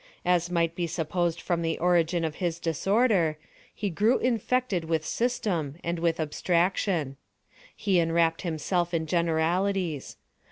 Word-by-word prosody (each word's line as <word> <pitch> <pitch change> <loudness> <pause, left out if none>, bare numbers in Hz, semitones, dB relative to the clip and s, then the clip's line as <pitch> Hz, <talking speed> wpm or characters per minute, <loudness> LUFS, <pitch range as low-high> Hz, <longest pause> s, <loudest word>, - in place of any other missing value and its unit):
As 175 -1 +2
might 170 -2 +1
be 170 0 -2
supposed 170 +1 -1
from 170 0 -1
the 165 -1 -1
origin 170 -1 +2
of 155 -2 -4
his 170 -3 -2
disorder, 175 - +2 0.3
he 205 -2 -3
grew 215 +9 +3
infected 240 -6 0
with 160 -1 -1
system, 200 - -1
and 170 0 -2
with 165 -1 0
abstraction. 170 -2 0 0.6
He 195 -3 +2
enwrapped 165 0 +2
himself 175 +1 -1
in 160 -1 0
generalities. 170 0 0
170 Hz, 130 wpm, -27 LUFS, 165-185 Hz, 0.6 s, grew